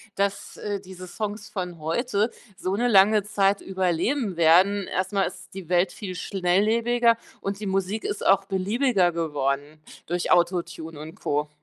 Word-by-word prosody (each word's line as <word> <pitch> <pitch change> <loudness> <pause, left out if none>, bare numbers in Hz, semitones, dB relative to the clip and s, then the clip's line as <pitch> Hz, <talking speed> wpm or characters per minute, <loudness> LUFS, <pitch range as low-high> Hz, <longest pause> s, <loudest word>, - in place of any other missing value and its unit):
dass, 200 0 -2
äh, 205 -1 -3
diese 185 -1 -10
Songs 210 +3 -5
von 180 -3 -5
heute 210 - 0 0.3
so 185 +1 -2
'ne 240 +4 +1
lange 205 0 +5
Zeit 200 -1 +1
überleben 190 - -1
werden. 185 +5 +4
Erst 185 +2 -2
mal 195 -1 +2
ist - - -11
die 185 -3 -9
Welt 180 0 +3
viel 185 -4 -6
schnelllebiger 225 +6 +2 0.2
und 195 +1 -3
die 215 - -5
Musik 195 +3 -1
ist - - -3
auch 195 0 +4
beliebiger 195 0 +1
geworden 150 -2 -2 0.2
durch 175 +1 -2
AutoTune 170 -3 0
und 155 +2 -9
Co. 150 +1 -1
190 Hz, 155 wpm, -25 LUFS, 175-205 Hz, 0.3 s, lange